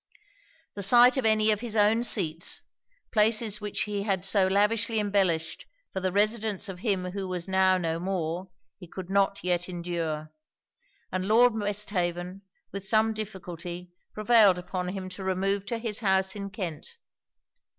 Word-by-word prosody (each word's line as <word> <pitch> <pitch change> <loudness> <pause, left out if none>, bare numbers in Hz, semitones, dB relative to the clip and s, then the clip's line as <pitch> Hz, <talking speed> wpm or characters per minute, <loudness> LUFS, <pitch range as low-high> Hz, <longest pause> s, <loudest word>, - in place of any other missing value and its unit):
The 200 - -6
sight 245 +5 +6
of 255 -4 +2
any 215 0 +4
of 210 - 0
his 230 -1 -3
own 215 +2 +3
seats; 170 -8 +1 0.5
places 215 -1 +2
which 210 -1 -3
he 205 -1 -2
had 195 -3 -1
so 195 -1 +3
lavishly 215 +3 +1
embellished 195 -6 0 0.3
for 190 - -2
the 185 0 -1
residence 210 0 0
of 190 -2 -7
him 185 -3 -1
who 195 0 -4
was 180 -1 -4
now 190 0 +3
no 165 -2 -2
more, 180 0 -3 0.3
he 180 - -11
could 185 +2 -8
not 200 0 +1
yet 175 0 0
endure; 170 -3 -4 0.8
and 185 0 -2
Lord 235 +3 +5
Westhaven 195 -3 -3 0.3
with 195 0 -6
some 220 +1 +3
difficulty 180 -4 -7 0.2
prevailed 215 -3 +4
upon 180 0 -4
him 185 0 -5
to 190 +1 -8
remove 195 +1 -1
to 235 - -2
his 225 -2 -4
house 190 -2 +1
in 200 -1 -5
Kent. 185 -7 -7
195 Hz, 155 wpm, -27 LUFS, 180-215 Hz, 0.8 s, sight